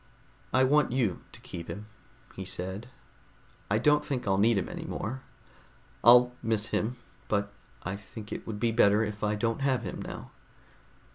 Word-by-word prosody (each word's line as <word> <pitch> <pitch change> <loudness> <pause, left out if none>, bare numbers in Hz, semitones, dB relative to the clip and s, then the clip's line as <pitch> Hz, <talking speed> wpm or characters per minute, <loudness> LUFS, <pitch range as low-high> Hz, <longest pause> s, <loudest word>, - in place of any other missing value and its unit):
"I 130 - +4
want 145 0 +4
you 120 -8 0
to - - -13
keep 85 - -7
him," 105 +1 -6 0.5
he - - -6
said. 95 +6 -5 0.8
"I 105 - +3
don't 150 +5 +4
think 130 -4 -3
I'll 95 0 +3
need 110 +1 +4
him 95 - -1
any - - -6
more. 130 +4 -4 0.8
I'll 125 +1 +8
miss 110 -2 0
him, 115 +4 0 0.3
but 100 -1 0 0.3
I 95 +2 -3
think 105 +1 -10
it - - -5
would 105 -2 -4
be 115 0 +2
better 105 -2 +5
if 105 -1 -4
I 105 0 +2
don't 115 +4 -1
have 130 -4 +1
him 95 - -5
now. - - -7
110 Hz, 170 wpm, -29 LUFS, 100-125 Hz, 0.8 s, I'll